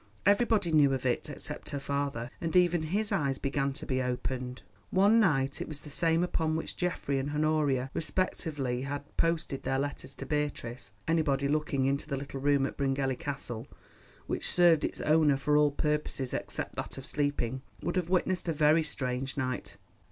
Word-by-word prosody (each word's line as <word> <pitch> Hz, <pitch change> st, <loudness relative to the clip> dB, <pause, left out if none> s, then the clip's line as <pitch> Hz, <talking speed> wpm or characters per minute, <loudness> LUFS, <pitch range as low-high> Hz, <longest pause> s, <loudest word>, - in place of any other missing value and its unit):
Everybody 205 Hz, -3 st, +3 dB
knew 145 Hz, -3 st, +5 dB
of 130 Hz, -, -5 dB
it, 125 Hz, -2 st, 0 dB
except -, -, -6 dB
her 140 Hz, -, -3 dB
father, 140 Hz, -4 st, -2 dB
and 165 Hz, 0 st, -2 dB
even 175 Hz, -2 st, +4 dB
his 200 Hz, +7 st, -1 dB
eyes 140 Hz, -9 st, +1 dB
began 140 Hz, 0 st, 0 dB
to 140 Hz, -, -7 dB
be 130 Hz, -1 st, 0 dB
opened. 125 Hz, 0 st, -3 dB, 0.3 s
One 205 Hz, +5 st, +5 dB
night—it 140 Hz, -9 st, +2 dB
was 150 Hz, -2 st, -7 dB
the 150 Hz, -, -10 dB
same 165 Hz, +2 st, +2 dB
upon 160 Hz, -3 st, 0 dB
which 160 Hz, -, -4 dB
Geoffrey 170 Hz, -6 st, -1 dB
and 135 Hz, +2 st, -2 dB
Honoria 150 Hz, -3 st, +1 dB
respectively 150 Hz, -7 st, -1 dB
had 145 Hz, +1 st, -5 dB
posted 160 Hz, -5 st, 0 dB
their 135 Hz, -, 0 dB
letters 140 Hz, -1 st, -4 dB
to 135 Hz, -, -7 dB
Beatrice—anybody 140 Hz, +1 st, -1 dB
looking 145 Hz, -2 st, +1 dB
into 140 Hz, +2 st, 0 dB
the 140 Hz, -3 st, -2 dB
little 140 Hz, 0 st, -6 dB
room 140 Hz, -1 st, +3 dB
at -, -, -5 dB
Bryngelly 135 Hz, -1 st, 0 dB
Castle, 130 Hz, -4 st, -5 dB, 0.6 s
which -, -, -1 dB
served 170 Hz, -3 st, +5 dB
its -, -, -2 dB
owner 150 Hz, -2 st, +4 dB
for 145 Hz, +2 st, +1 dB
all 150 Hz, 0 st, +5 dB
purposes 150 Hz, -3 st, -1 dB
except -, -, -3 dB
that -, -, -4 dB
of 135 Hz, -, -7 dB
sleeping, 145 Hz, -4 st, -1 dB, 0.2 s
would 175 Hz, -, -1 dB
have 180 Hz, -2 st, 0 dB
witnessed 185 Hz, -1 st, +1 dB
a -, -, +2 dB
very 155 Hz, +2 st, +4 dB
strange 135 Hz, -3 st, -3 dB
sight. 130 Hz, -3 st, -3 dB
145 Hz, 175 wpm, -30 LUFS, 135-160 Hz, 0.6 s, knew